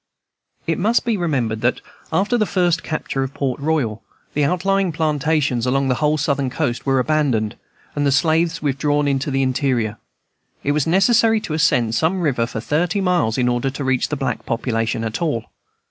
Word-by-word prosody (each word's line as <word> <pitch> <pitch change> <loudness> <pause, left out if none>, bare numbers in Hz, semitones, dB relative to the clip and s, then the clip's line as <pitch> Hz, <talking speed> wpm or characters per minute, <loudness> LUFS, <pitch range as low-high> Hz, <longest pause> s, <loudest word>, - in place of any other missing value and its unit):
It 165 - -1
must 225 +7 +2
be 235 -2 +1
remembered 130 - -1
that, 120 +2 +1 0.3
after 195 +9 +1
the 215 -3 +1
first 175 -3 +1
capture 155 -3 -3
of 135 0 -4
Port 135 -2 -2
Royal, 140 -8 -1 0.3
the 150 - +1
outlying 185 +4 +1
plantations 150 -5 0
along 135 +1 +1
the - - +3
whole 150 0 +2
Southern 140 -2 0
coast 130 -2 -2
were 135 0 +3
abandoned, 130 -6 +1 0.4
and 145 - 0
the 140 - +2
slaves 165 +3 +1
withdrawn 145 +1 +1
into 135 0 0
the 135 0 +1
interior. 125 -5 0 0.6
It 145 - +1
was 150 0 0
necessary 220 +5 +4
to 165 - -5
ascend 125 -8 +2
some 160 +11 +1
river 125 -8 +1
for 115 - -5
thirty 170 - 0
miles 180 - +1
in 125 -1 +2
order 120 +2 0
to 140 +1 -5
reach 130 -1 +1
the 150 - -1
black 135 -3 -3
population 115 -1 -1
at 110 +5 -3
all. 145 -9 -2
145 Hz, 180 wpm, -20 LUFS, 125-165 Hz, 0.6 s, necessary